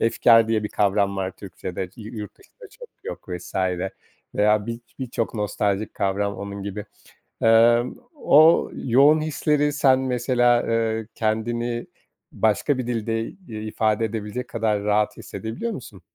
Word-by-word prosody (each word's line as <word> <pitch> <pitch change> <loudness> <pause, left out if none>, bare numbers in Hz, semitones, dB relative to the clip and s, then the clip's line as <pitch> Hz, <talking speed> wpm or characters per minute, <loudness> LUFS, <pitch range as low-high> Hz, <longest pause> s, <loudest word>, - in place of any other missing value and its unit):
efkâr 115 0 +4
diye 110 -1 +1
bir 105 - -2
kavram 100 -1 +1
var 95 -1 -2
Türkçede, 95 -1 -7
yu 110 +1 -9
yurt 105 -2 -8
dışında - - -16
çok - - -13 0.2
yok - - -7
vs. 90 -1 -7 0.8
Veya 105 0 +2
bir 115 0 -4 0.2
birçok 120 -3 -3
nostaljik 105 -1 -1
kavram 100 +1 -1
onun 100 0 -6
gibi. 100 +1 -5 0.6
Emm, 115 +2 +4 0.2
o 160 - +5
yoğun 140 +5 +4
hisleri 150 -1 +1
sen, 135 -3 +4
mesela, 120 -1 +2
ııı, 115 -1 -1
kendini 120 +2 -1 0.4
başka 110 +6 +1
bir 125 -2 -3
dilde, 115 -1 -1
iii, - - -11 0.3
ifade 110 0 +1
edebilecek 110 +2 -4
kadar 110 -3 -1
rahat 105 0 +1
hissedebiliyor 110 - -5
musun? 115 - -9
115 Hz, 135 wpm, -23 LUFS, 105-120 Hz, 0.8 s, o